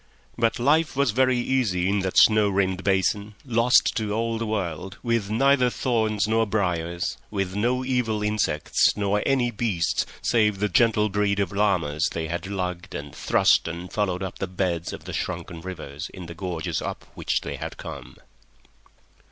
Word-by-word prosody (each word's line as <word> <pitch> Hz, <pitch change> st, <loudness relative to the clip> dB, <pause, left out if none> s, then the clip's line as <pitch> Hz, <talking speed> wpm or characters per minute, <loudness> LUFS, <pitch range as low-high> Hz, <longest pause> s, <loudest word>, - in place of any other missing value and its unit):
But 115 Hz, -1 st, +1 dB
life 150 Hz, +6 st, +2 dB
was 140 Hz, -3 st, +2 dB
very 130 Hz, +2 st, +3 dB
easy 120 Hz, -8 st, +1 dB
in 100 Hz, +1 st, +1 dB
that 95 Hz, -1 st, -2 dB
snow 110 Hz, -2 st, +6 dB
rimmed 95 Hz, -1 st, 0 dB
basin, 100 Hz, +2 st, 0 dB
lost 120 Hz, 0 st, +4 dB
to 105 Hz, -2 st, -1 dB
all 115 Hz, +1 st, -1 dB
the 115 Hz, -, -2 dB
world, 95 Hz, -3 st, -3 dB
with 115 Hz, -4 st, 0 dB
neither 130 Hz, +3 st, +3 dB
thorns 110 Hz, -5 st, 0 dB
nor 110 Hz, 0 st, +2 dB
briers, 90 Hz, -4 st, -1 dB
with 95 Hz, -2 st, -2 dB
no 125 Hz, +5 st, 0 dB
evil 120 Hz, -5 st, 0 dB
insects 105 Hz, -8 st, +1 dB
nor 105 Hz, 0 st, +1 dB
any 130 Hz, -3 st, +2 dB
beasts 100 Hz, -7 st, 0 dB, 0.2 s
save 105 Hz, -4 st, +2 dB
the 105 Hz, +1 st, 0 dB
gentle 105 Hz, +2 st, +3 dB
breed 100 Hz, 0 st, +1 dB
of 100 Hz, -3 st, 0 dB
llamas 90 Hz, -7 st, +1 dB
they 80 Hz, -1 st, -3 dB
had 85 Hz, +3 st, -3 dB
lugged 90 Hz, -3 st, -4 dB
and 75 Hz, 0 st, -6 dB
thrust -, -, +3 dB
and 85 Hz, +2 st, -6 dB
followed 95 Hz, -3 st, -1 dB
up 95 Hz, -, -6 dB
the 95 Hz, -, -2 dB
beds 90 Hz, -2 st, -2 dB
of -, -, -8 dB
the -, -, -6 dB
shrunken 85 Hz, -1 st, -4 dB
rivers 80 Hz, -5 st, -7 dB
in 95 Hz, -2 st, -9 dB
the 85 Hz, -, -8 dB
gorges 85 Hz, -2 st, -3 dB
up -, -, -5 dB
which -, -, -1 dB
they -, -, -5 dB
had -, -, -6 dB
come. 70 Hz, -5 st, -8 dB
100 Hz, 170 wpm, -25 LUFS, 90-115 Hz, 0.2 s, snow